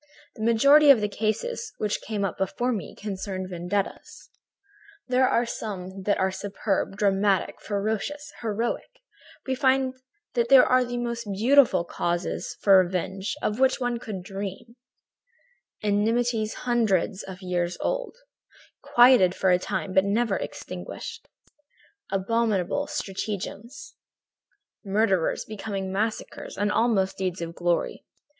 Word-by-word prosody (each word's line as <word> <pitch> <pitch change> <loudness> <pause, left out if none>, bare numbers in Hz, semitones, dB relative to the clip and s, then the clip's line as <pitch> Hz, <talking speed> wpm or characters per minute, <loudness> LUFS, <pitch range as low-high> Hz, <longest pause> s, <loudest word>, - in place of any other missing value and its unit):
"The - - -10
majority 280 +7 +6
of 275 -5 +8
the 210 - 0
cases 225 - -2
which 210 -1 -1
came 205 -2 -2
up 185 - -4
before 240 +6 0
me 200 -10 -4
concerned 190 -2 -5
vendettas. 180 +3 -4 0.8
There 255 0 +3
are 235 - +2
some 190 -4 -6
that 205 - +2
are 190 0 +1
superb, 195 0 -2
dramatic, 200 -1 +1
ferocious, 220 +9 -3
heroic. 230 +1 -2 0.6
We 265 - -1
find 260 -1 +2 0.4
there 235 -2 +1 0.4
the 245 0 -4
most 235 -3 -3
beautiful 245 +1 +4
causes 175 0 -3
for 195 -2 +7
revenge 190 +3 -3
of 210 +3 -1
which 265 +1 +3
one 245 -2 -1
could 205 -6 -6
dream, 195 +4 -7 1.1
enmities 220 +2 +1
hundreds 215 -5 +1
of 190 0 -10
years 175 -1 -1
old, - - -2 0.6
quieted 240 -7 +5
for 190 - +2
a 180 - +4
time 185 +1 -3
but 190 - +5
never 205 +1 +1
extinguished; - - -7 0.8
abominable 215 +5 0
stratagems, 210 +1 -5 0.9
murders 195 -4 +1
becoming 200 -3 -5
massacres 215 +3 -3
and 205 0 +1
almost 210 -5 +1
deeds 185 -1 -2
of 170 0 -5
glory. 175 0 -1
210 Hz, 120 wpm, -26 LUFS, 190-235 Hz, 1.1 s, of